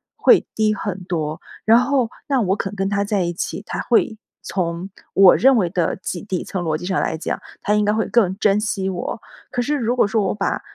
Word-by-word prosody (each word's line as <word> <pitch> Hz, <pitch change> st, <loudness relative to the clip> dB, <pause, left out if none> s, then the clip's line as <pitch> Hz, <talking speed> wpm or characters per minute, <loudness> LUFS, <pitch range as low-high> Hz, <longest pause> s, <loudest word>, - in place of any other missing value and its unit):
会 -, -, +5 dB
低 215 Hz, -1 st, +2 dB
很 195 Hz, -3 st, -4 dB
多。 155 Hz, -3 st, -3 dB, 0.3 s
然 225 Hz, +2 st, +6 dB
后 255 Hz, -2 st, +1 dB, 0.2 s
那 275 Hz, -2 st, +2 dB
我 190 Hz, -2 st, +1 dB
肯 200 Hz, -1 st, -4 dB
跟 195 Hz, -1 st, -1 dB
他 200 Hz, 0 st, 0 dB
在 205 Hz, -1 st, 0 dB
一 175 Hz, 0 st, -2 dB
起， 190 Hz, +3 st, -4 dB
他 -, -, -4 dB
会 230 Hz, -2 st, +1 dB, 0.3 s
从， 175 Hz, 0 st, -3 dB, 0.2 s
我 195 Hz, -1 st, +7 dB
认 265 Hz, +1 st, +5 dB
为 185 Hz, -6 st, +1 dB
的 175 Hz, -3 st, 0 dB
几 185 Hz, -1 st, -5 dB
底 190 Hz, -4 st, -3 dB
层 185 Hz, -2 st, -4 dB
逻 155 Hz, -2 st, 0 dB
辑 175 Hz, -, -8 dB
上 185 Hz, 0 st, 0 dB
来 160 Hz, -, -1 dB
讲， 160 Hz, -, -3 dB, 0.2 s
他 210 Hz, -, 0 dB
应 210 Hz, 0 st, +3 dB
该 205 Hz, -, +3 dB
会 220 Hz, +1 st, 0 dB
更 195 Hz, -6 st, +2 dB
珍 205 Hz, -1 st, +3 dB
惜 205 Hz, -3 st, -2 dB
我。 185 Hz, +3 st, -4 dB, 0.3 s
可 245 Hz, -, -1 dB
是 295 Hz, +4 st, 0 dB
如 245 Hz, -3 st, 0 dB
果 250 Hz, -, +4 dB
说 220 Hz, +1 st, +1 dB
我 195 Hz, -, -1 dB
把 -, -, -1 dB
200 Hz, 245 characters per minute, -21 LUFS, 180-220 Hz, 0.3 s, 我